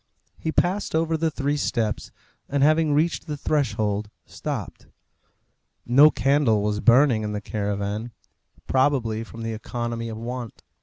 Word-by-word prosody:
He 160 - -2
passed 180 +2 0
over 165 0 +1
the 160 0 +1
three 145 0 -1
steps; 115 -6 -1 0.4
and 140 0 +1
having 155 +1 +4
reached 160 +4 +1
the 150 -1 -4
threshold, 110 -8 -1 0.2
stopped. - - -6 1.0
No 140 +5 +7
candle 135 -8 +2
was 105 0 0
burning 125 0 +5
in 105 0 -3
the 105 - -2
caravan, 105 +2 -3 0.5
probably 130 -5 +1
from 115 0 -9
the 115 0 -3
economy 115 +1 -4
of 110 - -6
want. 120 0 -6
120 Hz, 140 wpm, -24 LUFS, 110-145 Hz, 1.0 s, No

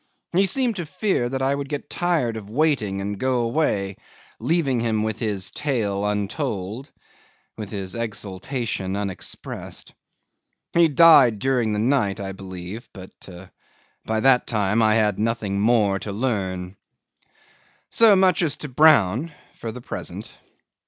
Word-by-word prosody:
He 190 +3 +3
seemed 240 +1 +1
to 175 - -3
fear 185 - -1
that 130 +1 -2
I 135 +1 +2
would 140 -1 -4
get 145 -2 -4
tired 165 -10 0
of 105 -2 -8
waiting 115 -7 0
and 100 0 -4
go 130 -2 +1
away, 115 -7 0 0.4
leaving 155 -7 +1
him 110 -2 0
with 110 0 -3
his 105 -5 -2
tale 105 -9 -1
untold, 105 - -3 0.7
with 105 -3 -7
his 95 -3 -5
exultation 110 -2 -3
unexpressed. 100 -2 -6 0.8
He 170 -1 +5
died 145 -7 +6
during 125 -1 0
the - - -1
night, 110 -3 +1
I 95 -1 -4
believe, 95 +3 -8
but 95 -1 -10 0.9
by 110 0 -1
that 130 0 +4
time 105 0 +1
I 110 -1 +4
had 105 -3 +1
nothing 110 -3 -1
more 105 -3 +2
to 105 - -6
learn. 95 -5 -3 1.1
'So 225 -3 +6
much 185 -1 +3
as 150 -4 +1
to 150 - -6
Brown, 140 - +4 0.2
for 115 - -6
the 125 - -9
present. - - -7
115 Hz, 140 wpm, -23 LUFS, 100-140 Hz, 1.1 s, died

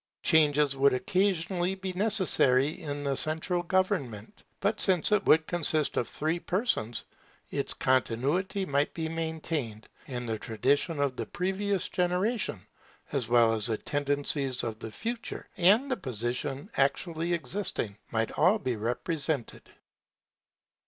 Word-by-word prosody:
Changes 150 -3 +4
would 135 -1 +4
occasionally 185 +3 0
be 190 -1 -5
necessary 175 - +2
in 145 -2 -4
the 140 -1 0
central 160 +5 -1
government; 175 - -1 0.2
but - - 0
since 185 -2 +5
it 210 - +3
would 160 0 +5
consist 155 -3 0
of 120 - 0
three 160 +3 -2
persons, 175 - -1 0.5
its - - -1
continuity 140 - 0
might 140 -2 +1
be 160 -1 -2
maintained, 160 -8 -3 0.2
and 125 -2 -4
the 110 -1 -2
traditions 140 - 0
of 140 -2 0
the - - -3
previous 195 +1 -1
generation, 180 - 0 0.5
as 135 -6 -1
well 120 -2 +5
as 110 -2 0
the 110 -2 0
tendencies 145 -2 -1
of 110 -2 -4
the 110 - -6
future, 230 - -5
and 210 +10 +4
the 260 - +1
position 130 - -3
actually 160 +5 0
existing, 165 - -2 0.2
might 115 -1 0
all 180 +7 +3
be 130 - -2
represented. 135 +4 -2
150 Hz, 130 wpm, -29 LUFS, 130-180 Hz, 0.5 s, since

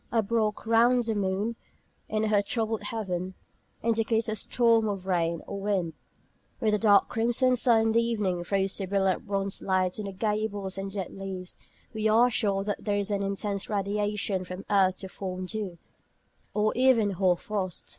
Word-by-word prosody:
A 225 -2 +2
"broch" 215 0 -1
round 235 +2 +4
the 225 - 0
moon, 205 +3 -1 0.5
in 215 0 0
her 210 -2 +3
troubled 220 +1 -2
heaven, 190 -4 -4 0.5
indicates 225 0 +1
a 215 - -1
storm 230 +1 +2
of 195 -3 -3
rain 170 -3 0
or 200 -1 -6
wind. 190 -5 -1 0.6
When 220 -4 +1
the 210 - +2
dark 205 -2 +5
crimson 240 +3 +2
sun 235 -2 +4
in 225 0 +2
the 230 +1 +4
evening 210 -7 -1
throws 195 +1 0
a 190 - -3
brilliant 195 +2 0
bronzed 195 -1 -1
light 185 0 0
on 210 - -4
the 200 - -4
gables 205 -1 -2
and 195 0 -4
dead 195 -2 -5
leaves, 190 -2 -6 0.4
we 220 0 0
are 235 +3 +5
sure 200 -4 +1
that 205 0 -3
there 205 -1 0
is 205 0 -1
an 200 -1 0
intense 200 0 -2
radiation 205 -1 -1
from 185 +1 -7
the - - -2
earth 190 -1 +4
to 190 - -8
form 185 -1 -5
dew, 195 -3 -5 0.8
or 215 0 +2
even 245 -5 +4
hoar 185 -1 +2
frost. 190 -3 -4
205 Hz, 180 wpm, -28 LUFS, 190-220 Hz, 0.8 s, dark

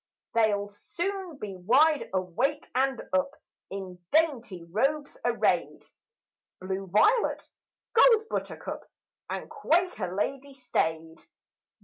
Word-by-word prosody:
They'll 210 -3 +2
soon 350 - -5
be 205 -6 -6
wide 270 - +3
awake 195 - -1
and 265 +1 +1
up, 275 +1 +1 0.3
In 185 -2 -7
dainty 250 - +1
robes 275 - -1
arrayed, - - +1 0.7
Blue 190 +1 -4
violet, 425 - +3 0.5
gold 450 -1 +6
buttercup, - - -5 0.4
And - - -4
quaker 330 - 0
lady 275 +6 -3
staid. 160 -10 -2
250 Hz, 95 wpm, -28 LUFS, 190-305 Hz, 0.7 s, gold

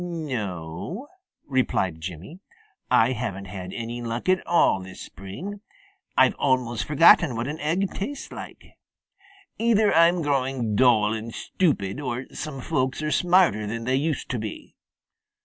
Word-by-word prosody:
"No," 130 - -5 0.4
replied 95 - 0
Jimmy, 90 - -8 0.5
"I 115 +3 +4
haven't 110 -6 -4
had 95 -1 -7
any 120 +1 -5
luck 115 +4 -4
at 185 -1 +3
all 170 - +3
this 95 0 -10
spring. 175 - -8 0.6
I've 130 -1 +6
almost 125 -5 +1
forgotten 150 -2 +6
what 115 +2 -2
an 150 +2 -4
egg 180 +6 0
tastes 280 +9 -5
like. - - -9 1.0
Either 220 -2 +3
I'm 170 +1 +4
growing 130 -6 0
dull 110 -3 +4
and 110 +1 -5
stupid, 135 - -1
or 130 -2 -3
some 140 -4 -5
folks 130 0 -1
are 155 - -1
smarter 175 - +3
than 115 +2 -4
they 130 +3 0
used 150 +3 -1
to 125 - -2
be. 105 -1 -7
130 Hz, 140 wpm, -25 LUFS, 110-165 Hz, 1.0 s, I've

